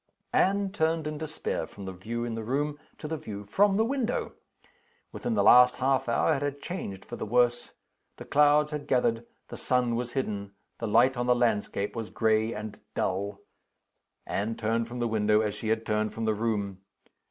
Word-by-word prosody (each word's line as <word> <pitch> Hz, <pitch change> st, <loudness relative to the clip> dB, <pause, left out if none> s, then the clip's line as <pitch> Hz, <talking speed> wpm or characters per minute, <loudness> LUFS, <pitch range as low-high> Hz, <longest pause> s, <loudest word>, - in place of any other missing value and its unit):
Anne 195 Hz, 0 st, +2 dB
turned 160 Hz, -4 st, 0 dB
in 150 Hz, -1 st, -4 dB
despair 155 Hz, 0 st, -3 dB
from 100 Hz, -, -10 dB
the 95 Hz, -, -4 dB
view 115 Hz, +6 st, -4 dB
in 120 Hz, -, -3 dB
the 115 Hz, 0 st, -4 dB
room 145 Hz, +5 st, -1 dB, 0.2 s
to 150 Hz, -, -6 dB
the 160 Hz, +1 st, -3 dB
view 105 Hz, -7 st, -7 dB
from 195 Hz, -, +3 dB
the 220 Hz, -, +3 dB
window. 250 Hz, -1 st, -1 dB, 0.8 s
Within 240 Hz, -2 st, -3 dB
the -, -, +3 dB
last 125 Hz, 0 st, +7 dB
half 130 Hz, -1 st, +1 dB
hour 115 Hz, +7 st, +3 dB
it 140 Hz, -, -2 dB
had 145 Hz, 0 st, -2 dB
changed 100 Hz, -, -6 dB
for -, -, -7 dB
the -, -, -4 dB
worse. 120 Hz, +1 st, +2 dB, 0.4 s
The -, -, -9 dB
clouds 150 Hz, +1 st, +4 dB
had 150 Hz, -1 st, -5 dB
gathered; 120 Hz, -3 st, +1 dB, 0.2 s
the -, -, -7 dB
sun 125 Hz, -2 st, +1 dB
was 120 Hz, 0 st, -3 dB
hidden; 100 Hz, -7 st, -3 dB, 0.3 s
the 115 Hz, -, -2 dB
light 120 Hz, +5 st, +4 dB
on 120 Hz, 0 st, -1 dB
the 125 Hz, -, +5 dB
landscape 105 Hz, -4 st, 0 dB
was 115 Hz, -2 st, -4 dB
gray 110 Hz, 0 st, +1 dB
and 105 Hz, -1 st, -6 dB, 0.2 s
dull. 100 Hz, +2 st, -2 dB, 0.8 s
Anne 110 Hz, +3 st, -2 dB
turned 115 Hz, +1 st, -1 dB
from 120 Hz, +1 st, -7 dB
the 120 Hz, -1 st, 0 dB
window, 105 Hz, -1 st, +3 dB
as 105 Hz, -2 st, -1 dB
she 105 Hz, +1 st, -5 dB
had 110 Hz, +1 st, 0 dB
turned 105 Hz, 0 st, -1 dB
from 115 Hz, -, -2 dB
the 110 Hz, -, +2 dB
room. 105 Hz, -3 st, -2 dB
120 Hz, 195 wpm, -28 LUFS, 110-145 Hz, 0.8 s, last